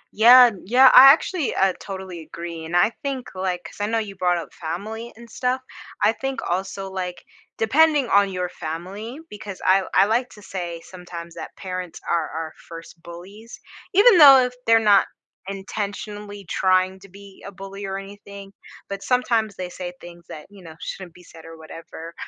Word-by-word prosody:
Yeah, 245 Hz, +3 st, +8 dB
yeah, 255 Hz, +5 st, +6 dB
I 270 Hz, +1 st, +11 dB
actually, 320 Hz, +1 st, -1 dB
uh, 190 Hz, -1 st, +2 dB
totally 190 Hz, -3 st, -8 dB
agree, 170 Hz, 0 st, -8 dB
and 170 Hz, +2 st, -1 dB
I 190 Hz, +6 st, +3 dB
think, 275 Hz, -4 st, -4 dB
like- 185 Hz, -1 st, -3 dB
'cause -, -, -10 dB
I 205 Hz, -, 0 dB
know 225 Hz, +1 st, -1 dB
you 210 Hz, -3 st, -4 dB
brought 180 Hz, -2 st, +1 dB
up 170 Hz, -, -8 dB
family 215 Hz, +8 st, -6 dB
and 235 Hz, +1 st, -14 dB
stuff- 250 Hz, +2 st, -1 dB, 0.4 s
I -, -, +5 dB
think 270 Hz, +2 st, -4 dB
also, 195 Hz, +2 st, -3 dB
like, 180 Hz, -1 st, -6 dB, 0.3 s
depending 285 Hz, +3 st, +3 dB
on 200 Hz, 0 st, +4 dB
your 180 Hz, -1 st, -3 dB
family 185 Hz, -, -7 dB
because 205 Hz, -2 st, -9 dB
I 190 Hz, +1 st, +4 dB
I -, -, +6 dB
like 240 Hz, +4 st, 0 dB
to 210 Hz, -, -15 dB
say 175 Hz, -4 st, -6 dB
sometimes 170 Hz, -2 st, -10 dB
that -, -, -9 dB
parents 185 Hz, -2 st, -7 dB
are 165 Hz, -2 st, 0 dB
our 160 Hz, 0 st, -6 dB
first 165 Hz, 0 st, -12 dB
bullies, 190 Hz, +7 st, -12 dB, 0.3 s
even 405 Hz, 0 st, +6 dB
though 280 Hz, -3 st, +10 dB
if 250 Hz, -, -5 dB
they're 225 Hz, 0 st, +6 dB, 0.2 s
not 195 Hz, -, +4 dB, 0.4 s
intentionally 205 Hz, +1 st, -6 dB
trying 185 Hz, +2 st, +1 dB
to 195 Hz, +1 st, -16 dB
be 200 Hz, +1 st, -15 dB
a -, -, -8 dB
bully 195 Hz, +1 st, -10 dB
or 195 Hz, 0 st, -4 dB
anything, 200 Hz, 0 st, -11 dB, 0.4 s
but 200 Hz, 0 st, -5 dB
sometimes 230 Hz, -4 st, 0 dB
they 180 Hz, -1 st, -6 dB
say 180 Hz, 0 st, -7 dB
things 175 Hz, 0 st, -13 dB
that, 150 Hz, -, -10 dB
you 200 Hz, -2 st, -15 dB
know, 160 Hz, -2 st, -12 dB
shouldn't 175 Hz, 0 st, -8 dB
be 180 Hz, -, -16 dB
said 165 Hz, -1 st, -15 dB
or 165 Hz, 0 st, -12 dB
whatever, 165 Hz, +1 st, -11 dB
195 Hz, 180 wpm, -22 LUFS, 175-220 Hz, 0.4 s, I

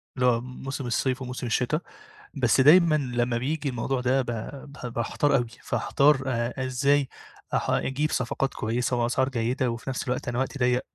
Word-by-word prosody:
اللي 125 Hz, -1 st, +1 dB
هو 115 Hz, -1 st, +3 dB
موسم 130 Hz, +1 st, -6 dB
الصيف 130 Hz, +2 st, 0 dB
وموسم 125 Hz, -1 st, -5 dB
الشِتا، 125 Hz, +7 st, +1 dB, 0.6 s
بس 125 Hz, -1 st, +3 dB
دايمًا 160 Hz, +3 st, +7 dB
لمّا 120 Hz, -4 st, 0 dB
بييجي 145 Hz, +3 st, -2 dB
الموضوع 125 Hz, +1 st, -2 dB
ده 130 Hz, +2 st, +2 dB
ب -, -, -5 dB, 0.5 s
ب 125 Hz, -4 st, -7 dB
باحتار 135 Hz, +5 st, +1 dB
أوي، 120 Hz, -1 st, -1 dB, 0.2 s
فاحتار 135 Hz, +4 st, +2 dB
آآ 125 Hz, +1 st, -1 dB
إزاي 140 Hz, +2 st, +2 dB, 0.4 s
أح -, -, 0 dB
أجيب 145 Hz, +4 st, 0 dB
صفقات 125 Hz, +2 st, -1 dB
كويسة 120 Hz, +3 st, -1 dB
وأسعار 130 Hz, +3 st, +1 dB
جيدة 125 Hz, +1 st, 0 dB
وفي 115 Hz, +3 st, -5 dB
نَفْس 130 Hz, -, -2 dB
الوقت 125 Hz, +2 st, -2 dB
أنا 120 Hz, 0 st, -1 dB
وقتي 135 Hz, +1 st, -2 dB
ضيّق 125 Hz, 0 st, +2 dB
130 Hz, 170 wpm, -26 LUFS, 120-135 Hz, 0.6 s, دايمًا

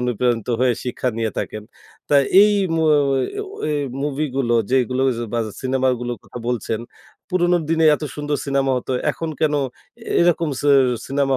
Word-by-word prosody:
অনুপ্রেরণিত 120 Hz, -1 st, 0 dB
হয়ে 130 Hz, -1 st, +4 dB
শিক্ষা 125 Hz, 0 st, -2 dB
নিয়ে 110 Hz, -1 st, 0 dB
থাকেন। 105 Hz, -, -4 dB, 0.5 s
তা -, -, +2 dB, 0.3 s
এই 210 Hz, 0 st, +5 dB, 0.2 s
মো 160 Hz, -, +1 dB, 0.3 s
ওয়ে 135 Hz, -1 st, +1 dB
ও 410 Hz, -, -5 dB, 0.2 s
এই 150 Hz, -1 st, 0 dB, 0.2 s
মুভিগুলো 135 Hz, -4 st, -1 dB, 0.2 s
যেগুলো 130 Hz, -1 st, +1 dB
ঐয 130 Hz, -, +2 dB, 0.2 s
বায 115 Hz, -, +1 dB, 0.2 s
সিনেমাগুলোর 130 Hz, -3 st, 0 dB
কথা -, -, -9 dB
বলছেন, 115 Hz, -2 st, -2 dB, 0.5 s
পুরনো 180 Hz, -1 st, +2 dB
দিনে 160 Hz, 0 st, +2 dB
এত 150 Hz, -, -7 dB
সুন্দর 145 Hz, 0 st, -2 dB
সিনেমা 135 Hz, -1 st, +1 dB
হতো। 125 Hz, +1 st, -3 dB, 0.2 s
এখন 165 Hz, -, -5 dB
কেনো 150 Hz, -2 st, +2 dB, 0.4 s
এ -, -, -13 dB
এরকম 170 Hz, -1 st, +2 dB
সি 145 Hz, -, 0 dB, 0.4 s
সিনেমা 135 Hz, -1 st, +1 dB
135 Hz, 160 wpm, -21 LUFS, 125-150 Hz, 0.5 s, এই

